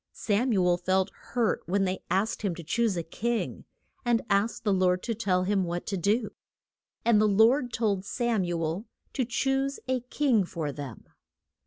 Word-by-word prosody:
Sam 225 +4 0
u 190 -4 +3
el 175 -1 +3
felt 185 +2 +1
hurt 235 -3 -1
when 195 +3 +1
they 190 0 -1
asked 195 +5 0
him 195 -5 -1
to 170 - -8
choose 215 +4 0
a 170 - -1
king, 230 +8 -3 0.4
and 240 -2 +2
asked 200 +4 +1
the 205 -3 +2
Lord 185 -1 +2
to 230 - -1
tell 190 -5 +1
him 195 0 +1
what 175 0 -3
to 200 - -2
do. 210 +5 +1 0.7
And 225 -3 +5
the 215 - +4
Lord 235 +5 +4
told 210 -5 0
Sam 230 0 0
u 175 -1 -2
el 165 +8 -3 0.3
to 260 - 0
choose 270 +3 0
a 260 0 +1
king 250 -3 +1
for 160 -4 -4
them. 140 -5 -8
205 Hz, 185 wpm, -28 LUFS, 180-235 Hz, 0.7 s, And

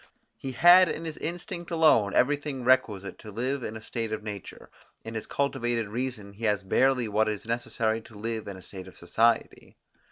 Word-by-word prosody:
He 130 - -6
had 175 +6 +7
in 165 +2 -4
his 160 -2 -6
instinct 175 +1 -5
alone 155 - +4
everything 145 -1 +1
requisite 115 -6 +1
to 110 - -10
live 130 +6 -2
in 110 -2 -5
a - - -11
state 115 0 -4
of 110 0 -3
nature; 105 -3 -8 0.3
in 115 - -7
his 110 -1 -5
cultivated 120 -6 -1
reason 115 -3 -4
he 110 +3 -6
has 105 -3 +1
barely 125 +5 +2
what 110 +1 +2
is 105 -1 -4
necessary 115 -1 -1
to 110 -1 -15
live 110 0 -4
in 100 -2 -6
a 95 - -12
state 95 0 -9
of - - -14
society. 115 +7 0
115 Hz, 190 wpm, -27 LUFS, 105-135 Hz, 0.3 s, had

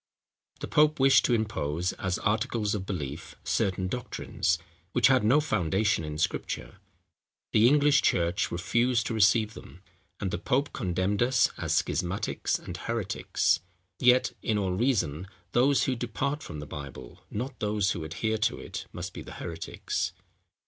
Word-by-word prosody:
The - - -3
pope 150 0 +3
wished 135 0 +6
to 120 - +3
impose, 90 -6 -1
as 95 -1 -2
articles 105 0 0
of 95 -2 -3
belief, 80 -3 -5
certain 95 -1 0
doctrines, 95 -6 -1 0.4
which 125 +1 +5
had 130 -4 +4
no 125 +8 +5
foundation 105 - +1
in 75 -1 -5
Scripture: 80 - -2 0.7
the 110 +2 +5
English 145 +1 +5
church 85 +2 +1
refused 115 +7 +1
to - - -2
receive 110 +1 +3
them; 90 -3 -13 0.4
and 95 -3 -2
the - - -2
pope 140 +4 0
condemned 95 -1 -1
us 125 +1 +3
as - - 0
schismatics 90 +2 0
and - - -7
heretics. 115 -4 0 0.4
Yet, 125 0 +5
in 110 - 0
all 95 -2 0
reason 95 - 0 0.2
those 130 +5 +4
who 130 - +1
depart 125 +5 -2
from 75 -3 -7
the - - -6
Bible, 70 -4 -9
not 125 +6 -5
those 105 -2 +1
who 85 - -3
adhere 110 +8 -2
to 110 +2 +1
it, - - -7
must - - -6
be - - -7
the - - -10
heretics. 85 -1 -4
105 Hz, 155 wpm, -28 LUFS, 90-125 Hz, 0.7 s, wished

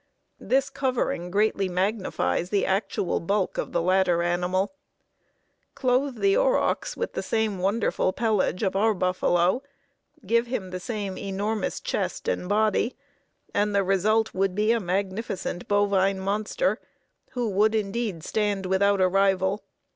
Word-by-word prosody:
This 265 +1 +1
covering 250 -9 -1
greatly 200 0 +1
magnifies 185 -1 -1
the 200 -1 +1
actual 195 -1 0
bulk 195 +2 -1
of - - -3
the 170 - 0
latter 180 -1 +3
animal. 180 +5 0 1.0
Clothe 255 +1 +1
the 395 0 +3
aurochs - - +1
with 475 - -3
the 220 -3 -1
wonderful 200 0 +1
pelage 215 -3 0
of 190 -1 0
our 215 +2 +3
buffalo, 180 +3 +1 0.6
give 235 +4 +2
him 200 -7 -4
the 185 - -4
same 200 -1 -4
enormous 205 +2 -2
chest - - -3
and 180 - -1
body, 215 +3 +1 0.6
and 205 0 +1
the 200 - +3
result 210 +4 +2
would 190 0 0
be 215 +2 +2
a 235 - +2
magnificent 190 -1 -3
bovine 200 -1 +2
monster, 210 - -1 0.5
who 245 -2 -1
would 210 +3 +2
indeed 210 -4 -2
stand 205 -1 -1
without 195 +2 +2
a 185 - +5
rival. 195 +1 +2
200 Hz, 135 wpm, -26 LUFS, 185-220 Hz, 1.0 s, a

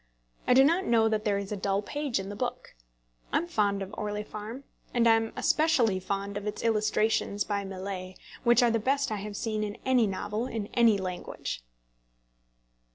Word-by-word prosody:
I 250 - +5
do 265 - +8
not 335 +7 +3
know 225 -1 +4
that 215 -1 0
there 205 -2 +2
is 200 0 -5
a - - -1
dull 195 +1 0
page 290 -2 -2
in 195 0 -5
the 205 - -6
book. - - -4 0.6
I - - +3
am 335 - 0
fond 205 - 0
of 195 +2 -9
Orley 210 -1 -3
Farm; 215 +6 -7 0.3
and 235 -1 +4
am 225 -1 +4
especially 250 -11 +3
fond 200 +2 -3
of 205 0 -5
its 210 - -4
illustrations 215 -2 +1
by 200 -1 -2
Millais, 190 -1 -6 0.3
which 240 0 +5
are 240 - +4
the 230 - +1
best 270 +2 +1
I 215 - -1
have 205 0 -6
seen 215 -2 -1
in 210 +1 -4
any 255 -4 +4
novel 210 +4 -3
in 220 -4 -4
any 230 -3 +5
language. 180 - -5
210 Hz, 190 wpm, -29 LUFS, 200-235 Hz, 0.6 s, do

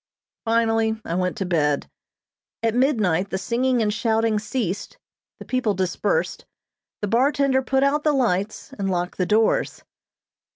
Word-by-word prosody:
Finally 225 -1 +1
I - - -3
went 180 +2 -1
to 195 - -2
bed. 150 -5 +1 0.8
At 225 -1 +2
midnight 215 - +1
the 190 - -2
singing 240 +4 +1
and 210 -1 0
shouting 225 -1 +1
ceased, 205 -3 -3 0.4
the - - -10
people 250 -5 0
dispersed, 190 - -1 0.6
the - - +1
bartender 265 +4 +2
put 265 +1 +1
out 290 +2 +2
the 305 - +3
lights, 215 -7 -1
and 195 -1 -1
locked 180 0 -2
the 180 - +1
doors. 220 +1 +1
220 Hz, 140 wpm, -23 LUFS, 190-255 Hz, 0.8 s, the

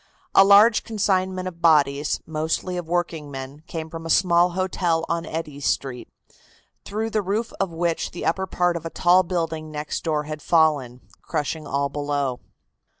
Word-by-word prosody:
A - - +8
large 205 +3 +6
consignment 190 -4 0
of 170 -2 -8
bodies, 145 -3 +3
mostly 160 +3 -2
of 175 -2 -4
workingmen, 150 -5 -3
came 160 -1 -5
from 165 0 -8
a 165 - -6
small 175 +1 +4
hotel 175 -3 0
on 170 -1 -2
Eddy 155 -3 -5
Street, 135 -3 -2 0.7
through 220 +2 -3
the 215 - +1
roof 210 +4 -2
of 195 - 0
which 165 0 -1
the 175 - -7
upper 190 +4 0
part 180 -1 +1
of 170 - -4
a 165 - -4
tall 180 +2 +4
building 165 -3 -3
next 150 -1 -4
door 155 -2 0
had 155 0 -6
fallen, 145 -8 +2 0.2
crushing 150 +1 -3
all 140 +1 0
below. 145 -3 -2
165 Hz, 160 wpm, -23 LUFS, 150-185 Hz, 0.7 s, A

